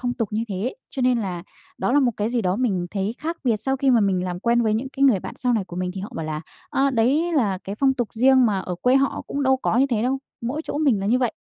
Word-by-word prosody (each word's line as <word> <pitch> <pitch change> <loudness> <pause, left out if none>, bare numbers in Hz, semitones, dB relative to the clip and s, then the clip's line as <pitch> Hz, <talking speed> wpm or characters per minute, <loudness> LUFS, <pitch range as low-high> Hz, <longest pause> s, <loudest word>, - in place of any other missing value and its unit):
phong 245 -1 -1
tục 225 -4 -2
như 220 +2 -1
thế. 200 +5 -3 0.2
Cho 260 - -3
nên 250 -1 +3
là 180 -5 -4 0.4
đó - - 0
là 290 - +5
một 255 -3 +3
cái 210 +2 -1
gì 240 -1 0
đó 185 0 0
mình 195 -8 0
thấy 200 +2 -2
khác 330 +3 -3
biệt 230 -4 +2
sau 265 +6 -1
khi 270 0 +2
mà 235 - +5
mình 190 -3 +1
làm 180 -1 -3
quen 235 +1 +2
với 215 -1 +1
những 245 +5 -2
cái 275 +1 -4
người 240 -9 +4
bạn - - -7
sau 250 -1 +1
này 215 -4 0
của 175 -1 -10
mình 180 0 -2
thì 190 - -5
họ 200 - -6
bảo 160 - -4
là, 155 0 -3 0.3
a, 275 +1 +2
đấy 270 +9 +2
là 210 - +1
cái 195 +2 -6
phong 265 +3 +2
tục 240 -4 -2
riêng 255 +1 +5
mà 205 -3 +1
ở 180 -1 -4
quê 255 +2 +4
họ 275 0 0
cũng 285 - -3
đâu 265 -1 +3
có 250 -2 0
như 270 - +4
thế 220 -2 +1
đâu, 265 +2 0 0.2
mỗi 265 +7 -3
chỗ 290 - -3
mình 270 -10 +2
là 195 - -2
như 240 +4 +3
vậy. 245 -3 0
235 Hz, 310 wpm, -23 LUFS, 200-265 Hz, 0.4 s, là